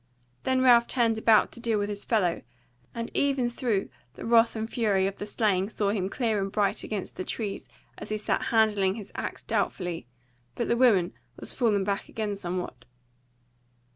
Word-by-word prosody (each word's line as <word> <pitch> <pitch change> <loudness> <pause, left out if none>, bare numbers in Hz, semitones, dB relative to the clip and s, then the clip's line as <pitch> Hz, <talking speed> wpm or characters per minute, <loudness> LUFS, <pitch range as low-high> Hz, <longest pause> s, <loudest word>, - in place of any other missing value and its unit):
Then 260 0 +2
Ralph 240 -2 +6
turned 230 -3 +1
about 220 -1 +4
to - - -10
deal 230 -2 0
with 205 0 0
his 205 -1 -5
fellow, 190 -7 +1 0.5
and 230 0 -4
even 270 -4 +1
through 230 -5 -1 0.3
the - - -8
wrath 230 0 +4
and 220 0 -2
fury 210 -5 +1
of 195 0 -2
the 205 - -5
slaying 205 -3 +1
saw 205 -3 0
him 195 -3 -1
clear 220 -3 0
and 195 0 -3
bright 205 -2 0
against 205 -4 -5
the - - -3
trees 205 0 -4 0.3
as - - -8
he 215 - -1
sat 210 - -1
handling 210 -4 +3
his 215 -3 -8
axe - - -4
doubtfully, 175 -8 -2 0.5
but 235 - -2
the 235 - +2
woman 220 -8 +4 0.3
was - - -4
fallen 215 -6 +2
back 200 0 -2
again 215 -2 -3
somewhat. 180 -9 -5
215 Hz, 180 wpm, -27 LUFS, 195-230 Hz, 0.5 s, Ralph